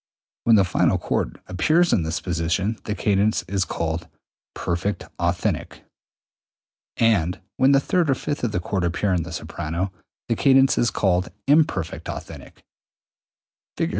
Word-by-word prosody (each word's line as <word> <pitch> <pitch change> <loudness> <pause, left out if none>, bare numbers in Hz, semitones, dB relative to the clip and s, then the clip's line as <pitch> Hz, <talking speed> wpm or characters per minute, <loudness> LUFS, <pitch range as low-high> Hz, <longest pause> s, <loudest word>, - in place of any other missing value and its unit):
When 115 - +6
the 100 - +5
final 90 - +2
chord - - -2
appears 155 - +2
in 95 - +3
this 80 0 -2
position 90 +5 -1
the 105 - -2
cadence 105 0 +1
is 95 +1 0
called 80 0 -3 0.5
perfect 90 +3 -2 0.2
authentic, - - -1 1.1
and 95 -7 +2 0.2
when 130 +1 +5
the 140 - +6
third 170 +3 +1
or 135 - +3
fifth 145 +1 -4
of 120 - 0
the 90 - -1
chord 90 +1 -2
appear 85 +3 0
in 90 - +1
the 90 +3 -7
soprano, 85 +3 -4 0.4
the - - +1
cadence 135 -1 +4
is 120 - +2
called 90 -2 +1 0.2
imperfect 140 - +1
authentic. - - -9 1.1
Fig. - - 0
95 Hz, 145 wpm, -23 LUFS, 85-120 Hz, 1.1 s, When